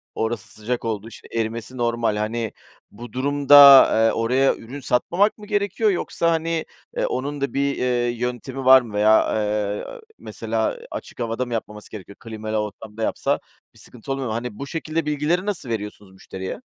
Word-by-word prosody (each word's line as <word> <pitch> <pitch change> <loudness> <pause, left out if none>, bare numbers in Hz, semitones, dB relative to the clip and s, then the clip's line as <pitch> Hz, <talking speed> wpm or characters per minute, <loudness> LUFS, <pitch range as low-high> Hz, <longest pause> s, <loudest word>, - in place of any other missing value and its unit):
orası 110 -1 -3
sıcak 115 +3 -4
oldu, 110 -1 -3
işte, 115 - -13
erimesi 115 +2 -3
normal. 115 -2 0
Hani, 110 +1 -2 0.4
bu 120 +1 -11
durumda, 145 +2 +4
aaa, 135 -5 +8
oraya 125 +4 +2
ürün 130 +6 -9
satmamak 175 - +1
mı 210 - -11
gerekiyor 205 +1 +1
yoksa, 170 -2 0
hani, 165 0 -1 0.3
eee, - - +1
onun 140 +2 -3
da 140 - -2
bir, 140 0 0
ııı, 120 -1 +1
yöntemi 125 +2 -4
var 130 0 +8
mı 115 -3 -10
veya, 105 +1 +4
eee, 105 -1 -1 0.3
mesela - - -3
açık - - -8
havada 115 +1 -2
mı 120 - -6
yapmaması 105 -2 -6
gerekiyor? 100 -1 -10
Klimalı 110 -1 -5
ortamda 105 +1 -5
yapsa - - 0 0.3
bir - - -20
sıkıntı 125 +2 -10
oluyor 135 -1 -2
mu? 110 - -3
Hani, 115 -1 -5
bu 140 - -5
şekilde 160 +1 -3
bilgileri 150 +5 0
nasıl 190 -11 -4
veriyorsunuz 105 -3 -5
müşteriye? 95 - -7
120 Hz, 170 wpm, -22 LUFS, 110-140 Hz, 0.4 s, aaa